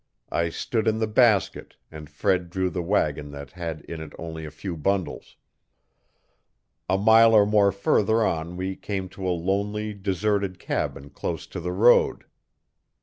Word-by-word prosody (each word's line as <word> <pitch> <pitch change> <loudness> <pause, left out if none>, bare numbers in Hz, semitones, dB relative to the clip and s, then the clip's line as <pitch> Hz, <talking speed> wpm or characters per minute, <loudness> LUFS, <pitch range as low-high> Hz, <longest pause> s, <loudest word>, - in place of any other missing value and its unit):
I 85 0 0
stood 110 +6 -2
in 110 0 +2
the 110 - +1
basket 110 -2 +2 0.2
and 75 -2 -10
Fred 90 +4 0
drew 95 0 -1
the 90 - -3
wagon 75 -5 0
that 70 -1 -9
had 85 -3 -5
in 80 -1 -8
it 80 -2 -9
only 80 -1 -7
a - - -6
few 85 +4 -6
bundles. 95 +3 -2 1.5
A 95 - +3
mile 110 +2 +6
or 105 -1 +6
more 105 -1 +4
further 110 +3 +2
on 85 +2 -2
we 95 +1 -3
came 95 -2 -4
to 95 0 -6
a - - +1
lonely, 100 +4 -1
deserted 100 -1 -1
cabin 70 -4 -4
close - - -4
to - - -7
the 90 +1 -3
road. 110 +7 +4
95 Hz, 160 wpm, -25 LUFS, 85-105 Hz, 1.5 s, mile